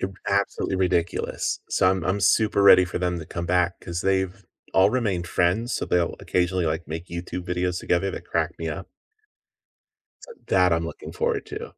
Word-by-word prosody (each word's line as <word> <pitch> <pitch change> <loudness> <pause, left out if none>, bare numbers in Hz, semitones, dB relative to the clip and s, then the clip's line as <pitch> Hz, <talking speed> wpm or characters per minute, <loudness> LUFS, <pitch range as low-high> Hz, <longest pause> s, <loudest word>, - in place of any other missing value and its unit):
ew 95 0 -3
absolutely 100 -1 0
ridiculous. 90 -2 -1
So, 90 - +3
I'm 95 -3 -1
I'm 95 +2 0
super 105 +2 +3
ready 90 -2 +8
for 90 - -4
them 90 -1 -1
to 80 - -8
come 85 -1 -5
back, 90 0 +2
'cause 85 -1 -5
they've 95 0 0 0.3
all 95 - +5
remained 100 -9 -1
friends, 95 +9 +1
so - - -1
they'll 85 -1 +1
occasionally, 90 0 0
like, 80 +2 -2
make 80 +3 -6
YouTube 90 +1 -5
videos 90 0 -1
together 95 +2 0
that - - -7
crack - - -1
me 80 0 -3
up. 85 +5 -5 1.4
So, - - -12 0.2
that 90 -2 +4
I'm 80 0 +1
looking - - -8
forward - - -1
to. - - -7
90 Hz, 185 wpm, -24 LUFS, 85-95 Hz, 1.4 s, ready